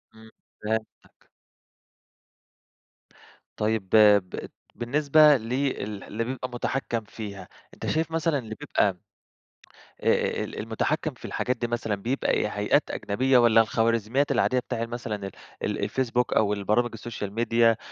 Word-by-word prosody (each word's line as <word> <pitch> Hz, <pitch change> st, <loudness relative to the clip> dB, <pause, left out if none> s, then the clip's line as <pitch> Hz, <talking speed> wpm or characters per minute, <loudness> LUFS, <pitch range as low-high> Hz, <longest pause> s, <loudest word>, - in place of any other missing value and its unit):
إمم 110 Hz, 0 st, -15 dB, 0.3 s
فهمتك. 110 Hz, +1 st, -5 dB, 2.3 s
طيب 105 Hz, -3 st, -1 dB
ب 105 Hz, -2 st, +7 dB, 0.5 s
بالنسبة 145 Hz, +4 st, +4 dB
ل 115 Hz, +1 st, -5 dB
ال 115 Hz, -7 st, -2 dB
اللي 115 Hz, +2 st, -3 dB
بيبقى 130 Hz, +1 st, -4 dB
مُتحكّم 120 Hz, -1 st, -2 dB
فيها، 105 Hz, -2 st, -8 dB, 0.3 s
أنت -, -, -8 dB
شايف 160 Hz, +1 st, 0 dB
مثلًا 165 Hz, -2 st, +1 dB
اللي 110 Hz, -3 st, -7 dB
بيبقى 105 Hz, -10 st, 0 dB, 1.0 s
آآ -, -, +1 dB
ال -, -, -7 dB
المُتحكّم -, -, -1 dB
في -, -, -13 dB
الحاجات 125 Hz, 0 st, -2 dB
دي 120 Hz, 0 st, -2 dB
مثلًا 115 Hz, -3 st, -2 dB
بيبقى 120 Hz, +7 st, -1 dB
إيه؟ -, -, +1 dB
هيئات -, -, +1 dB
أجنبية 130 Hz, +5 st, +1 dB
والّا 115 Hz, -2 st, +6 dB
الخوارزميات 115 Hz, +4 st, +1 dB
العادية 130 Hz, -, +2 dB
بتاع 115 Hz, -2 st, -3 dB
مثلًا 115 Hz, -2 st, -4 dB
ال 100 Hz, -2 st, -6 dB, 0.3 s
ال -, -, -1 dB
الفيسبوك 125 Hz, -2 st, 0 dB
أو 105 Hz, -1 st, +3 dB
البرامج 105 Hz, +4 st, +1 dB
السوشيال 110 Hz, -3 st, -6 dB
ميديا 115 Hz, 0 st, +3 dB
115 Hz, 130 wpm, -26 LUFS, 110-130 Hz, 2.3 s, ب